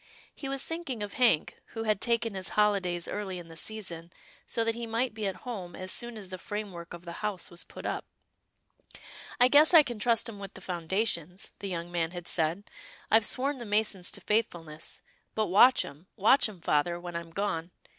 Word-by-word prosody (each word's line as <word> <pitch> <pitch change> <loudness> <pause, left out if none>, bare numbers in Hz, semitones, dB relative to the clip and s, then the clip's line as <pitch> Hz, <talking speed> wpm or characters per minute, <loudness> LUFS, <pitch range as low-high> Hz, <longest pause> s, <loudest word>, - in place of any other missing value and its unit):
He 270 - -6
was 275 0 0
thinking 315 -10 -4
of 205 - -6
Hank, 235 - +2 0.2
who 225 - -2
had 215 -2 +1
taken 235 -2 +2
his 190 -1 -2
holidays 190 -5 +2
early 195 -3 -3
in 170 -1 -9
the 165 - -11
season 175 -3 -3 0.4
so 230 - +1
that 225 0 +1
he 235 0 -5
might 230 +2 0
be 215 -2 -2
at 190 - -2
home 190 -8 -5
as 185 0 -2
soon 240 -1 0
as 195 -3 -7
the 185 - -5
framework 185 -4 -5
of 175 +1 -13
the 170 - -6
house 210 -5 -2
was 175 - -3
put - - -10
up. - - -2 0.7
" - - -16
I 245 - +8
guess 300 +6 +6
I 315 - +10
can 240 -5 -5
trust 230 +1 +2
'em 215 -3 -8
with 195 -1 -8
the - - -7
foundation," 180 0 -1 0.2
the 200 - -4
young 175 -1 -4
man 170 -2 0
had 175 0 -7
said, 165 +4 +1 0.2
" - - -20
I've 220 -1 +6
sworn 270 +1 +1
the - - -5
masons 205 -3 +2
to - - -5
faithfulness 170 -8 -2
— - - -42
but 220 - +2
watch 245 +8 +6
'em, 145 +6 -12
watch 225 +4 +4
'em, 190 -5 -12
father, 170 +4 +1
when 175 -1 -7
I'm 170 0 -4
gone. 170 -2 -2
200 Hz, 215 wpm, -30 LUFS, 175-230 Hz, 0.7 s, I